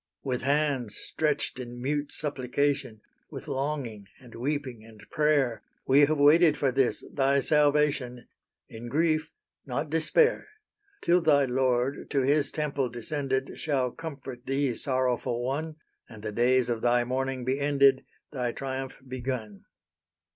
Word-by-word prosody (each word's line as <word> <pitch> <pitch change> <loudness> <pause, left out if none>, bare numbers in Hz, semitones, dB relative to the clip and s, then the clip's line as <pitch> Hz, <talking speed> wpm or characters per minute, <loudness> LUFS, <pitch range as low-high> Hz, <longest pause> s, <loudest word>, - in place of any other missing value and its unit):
With 125 -3 -2
hands 140 -5 0
stretched 150 -4 -2
in 120 -1 -7
mute 145 +3 -2
supplication, 140 -4 -1 0.3
With - - -9
longing, 130 -7 -3
and 125 -3 -15
weeping, 130 -2 -3
and 110 -2 -15
prayer, 145 -7 +2 0.2
We 140 +2 +5
have 155 +1 0
waited 150 +2 +5
for 135 -2 +1
this, 135 -1 0
thy 140 0 +2
salvation, 145 -5 +1 0.4
In 115 +2 -9
grief 155 +3 +1 0.3
not 140 +3 -4
despair; 165 - +2 0.5
Till 175 +1 +3
thy 145 -4 +4
Lord 130 +1 0
to 140 - +1
His 140 +2 +2
temple 140 -4 -1
descended, 135 +2 -3
Shall 135 -5 0
comfort 135 -6 -8
thee, 135 -1 +1
sorrowful 125 -1 0
one, 155 +5 -3 0.3
And 110 -3 -12
the 105 - -3
days 125 +3 +2
of 115 -2 -2
thy 120 0 +3
mourning 130 0 -2
be 130 +2 0
ended, 140 -2 +4 0.3
Thy 125 -3 -2
triumph 135 -1 -5
begun. 125 -5 -5
135 Hz, 135 wpm, -28 LUFS, 125-145 Hz, 0.5 s, We